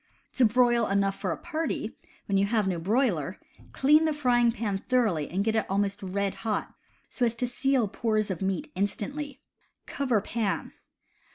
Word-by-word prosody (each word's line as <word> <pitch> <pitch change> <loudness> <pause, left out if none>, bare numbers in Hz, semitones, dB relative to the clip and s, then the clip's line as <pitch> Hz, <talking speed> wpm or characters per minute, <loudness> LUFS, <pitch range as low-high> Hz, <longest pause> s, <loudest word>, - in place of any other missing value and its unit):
To 255 - +4
broil 240 0 +3
enough 195 0 +1
for 185 - -1
a - - -2
party, 315 -9 -3 0.3
when 200 - -1
you 195 +1 +3
have 215 -2 +1
no 180 -3 -1
broiler, 190 - 0 0.3
clean 300 +4 +4
the 310 - +1
frying 245 -5 +3
pan 215 -4 -2
thoroughly 215 - +1
and 190 +3 0
get 220 +1 0
it 220 - 0
almost 200 +1 0
red 195 +1 -1
hot, 220 -2 -2 0.4
so 250 - -2
as 235 -1 +2
to 250 - -1
seal 255 -1 +1
pores 215 0 0
of 180 - -4
meat 190 -2 -2
instantly. 270 +9 -3 0.4
Cover 255 -6 0
pan. 210 0 -2
220 Hz, 170 wpm, -28 LUFS, 195-250 Hz, 0.4 s, To